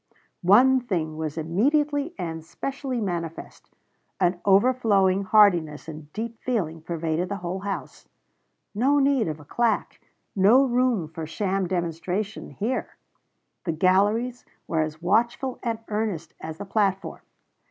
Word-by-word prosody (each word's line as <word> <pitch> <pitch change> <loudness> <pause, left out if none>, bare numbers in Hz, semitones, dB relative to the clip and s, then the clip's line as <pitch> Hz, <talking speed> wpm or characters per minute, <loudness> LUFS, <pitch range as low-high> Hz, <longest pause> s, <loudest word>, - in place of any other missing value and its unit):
One 250 +9 +6
thing 170 -10 -2
was 155 0 -4
immediately 285 - +1
and 160 -2 -4
specially 265 - -4
manifest: 170 -5 -5 0.5
an 175 -1 +1
overflowing 200 -3 +3
heartiness 175 -9 +4
and 155 -1 -9
deep 230 +3 -5
feeling 170 -11 -2
pervaded 165 +1 -2
the 200 - -2
whole 180 +2 -2
house. 195 0 -6 0.7
No 265 +7 +3
need 275 -5 +3
of 155 -1 -4
a 145 - -14
claque, 235 +8 -1 0.3
no 210 +8 +6
room 245 -8 +1
for 160 0 -7
sham 195 +2 -1
demonstration 180 +4 -3
here! 235 +5 -3 0.7
The 165 - 0
galleries 205 +9 +2 0.2
were 160 -1 +1
as 155 +1 -4
watchful 235 +7 +1
and 230 -2 -1
earnest 210 -7 -3
as 160 0 -6
the 200 - -6
platform. 195 -1 -1
195 Hz, 130 wpm, -25 LUFS, 165-235 Hz, 0.7 s, One